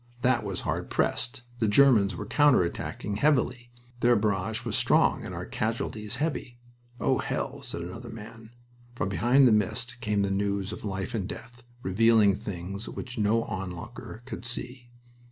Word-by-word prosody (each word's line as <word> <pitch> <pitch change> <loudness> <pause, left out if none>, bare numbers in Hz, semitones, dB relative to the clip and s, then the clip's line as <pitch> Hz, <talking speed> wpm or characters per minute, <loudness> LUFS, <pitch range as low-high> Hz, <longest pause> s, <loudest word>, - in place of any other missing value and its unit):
That 125 -2 +3
was 100 -3 -4
hard - - -2
pressed. 120 +1 0 0.2
The 110 - +2
Germans 105 -4 +5
were 105 - -5
counter 145 -3 +5
attacking 100 +3 -4
heavily. 125 -2 +1 0.3
Their 120 0 +5
barrage 105 +2 0
was 115 - -1
strong - - +3
and - - -6
our - - -5
casualties 110 -2 -3
heavy. 145 -6 -3 0.4
"Oh, - - +2
hell!" - - -3
said 85 - -5
other 115 +7 -7
men. 110 0 -10 0.5
From 105 - -1
behind 125 +6 +5
the - - +5
mist 120 +4 0
came 105 -3 +1
the 100 - 0
news 100 0 -1
of - - -8
life 95 -2 -3
and 100 -5 -2
death, 120 +2 -9 0.2
revealing 105 +1 +5
things 100 +2 -6
which 125 -2 -6
no 110 +2 +3
onlooker 95 +4 -7
could 120 -4 -7
see. 120 +1 -5
110 Hz, 160 wpm, -28 LUFS, 100-120 Hz, 0.5 s, Germans